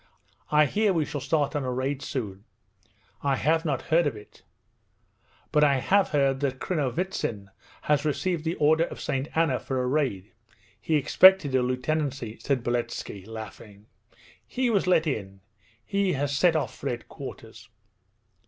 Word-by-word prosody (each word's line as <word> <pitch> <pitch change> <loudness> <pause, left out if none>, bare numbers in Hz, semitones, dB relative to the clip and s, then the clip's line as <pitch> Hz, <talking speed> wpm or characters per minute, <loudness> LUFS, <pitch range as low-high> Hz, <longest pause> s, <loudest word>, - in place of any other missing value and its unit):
'I 150 0 +5
hear 205 +7 +1
we 160 -3 +1
shall 145 - -5
start 145 +1 0
on 145 - -1
a 130 - -2
raid 130 +2 -2
soon.' 105 -10 -5 0.8
'I 140 -1 +1
have 160 +4 +1
not 145 -4 -1
heard 165 0 +2
of 135 - -2
it; 105 -1 -14 1.1
but 150 - +4
I 140 -2 +4
have 195 +9 +2
heard 135 -3 +1
that 135 -2 -1
Krinovitsin 135 - -2 0.3
has 150 -1 +2
received 155 +3 -1
the 165 +1 -1
Order 160 +2 +3
of - - -9
St. 135 -1 -2
Anna 160 -6 +2
for 130 -1 -3
a 125 - 0
raid. 125 -8 -1 0.5
He 155 +8 0
expected 170 +1 +6
a 130 - +3
lieutenancy,' 130 -2 -2
said 135 -4 -1
Beletski 120 -5 -3
laughing. 110 -2 -10 0.6
'He 255 -1 -1
was 200 -4 +1
let 175 -3 +4
in! 100 -9 -4 0.4
He 200 -2 0
has 140 0 -1
set 170 +3 +3
off 155 - -1
for 140 - -4
headquarters.' 120 -2 -8
140 Hz, 155 wpm, -26 LUFS, 125-160 Hz, 1.1 s, expected